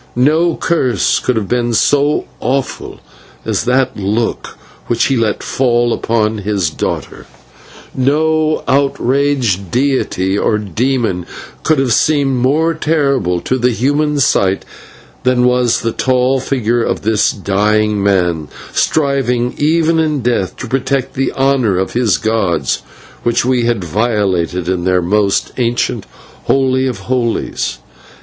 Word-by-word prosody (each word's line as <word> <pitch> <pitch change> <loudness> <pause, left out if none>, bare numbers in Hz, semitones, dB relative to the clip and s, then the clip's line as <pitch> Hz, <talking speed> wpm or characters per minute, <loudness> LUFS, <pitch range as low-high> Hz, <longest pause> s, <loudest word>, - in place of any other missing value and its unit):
No 155 +7 +2
course 130 - +1
could 125 - -1
have 110 -3 -2
been 120 0 0
so 145 +5 +2
awful 135 +3 -3 0.5
as - - -1
that 130 +1 +1
look 105 +3 -2 0.3
which 115 - +1
he 135 - +2
let 115 -3 0
fall 120 -2 +1
upon 110 -1 0
his 100 -5 -1
daughter, - - -4 0.7
and 130 - -1
no 155 +1 +1
outraged 135 -7 +1
deity 120 -7 0
or 105 - +1
demon 110 -2 -1 0.3
could 155 - +2
have 135 -3 +1
seemed 140 -2 +2
more 150 +7 +2
terrible 140 - 0
to 130 - -1
the 125 +1 +2
human 145 +5 0
sight 100 -7 +1 0.6
than 125 -1 +2
was 125 -1 +2
the 115 - -1
tall 130 +2 +1
figure 120 -3 0
of - - -2
this 110 0 +2
dying 105 +1 0
man, 90 -6 +1 0.3
striving 130 -5 +1
even 160 +2 +2
in 155 -3 0
death 115 -6 -1
to 125 - -6
protect 135 +2 -1
the 135 - -1
honour 130 -7 +1
of 95 0 -2
his 115 -5 +2
gods, 95 -10 0 0.4
which 120 0 +1
we 125 -2 +1
had 115 -5 0
violated 95 -3 -1
in 90 -1 -1
their 90 0 +1
most 100 +2 +1 1.0
holy 130 -1 +2
of 125 -6 -4
holies. 120 +1 -2
120 Hz, 130 wpm, -15 LUFS, 105-135 Hz, 1.0 s, No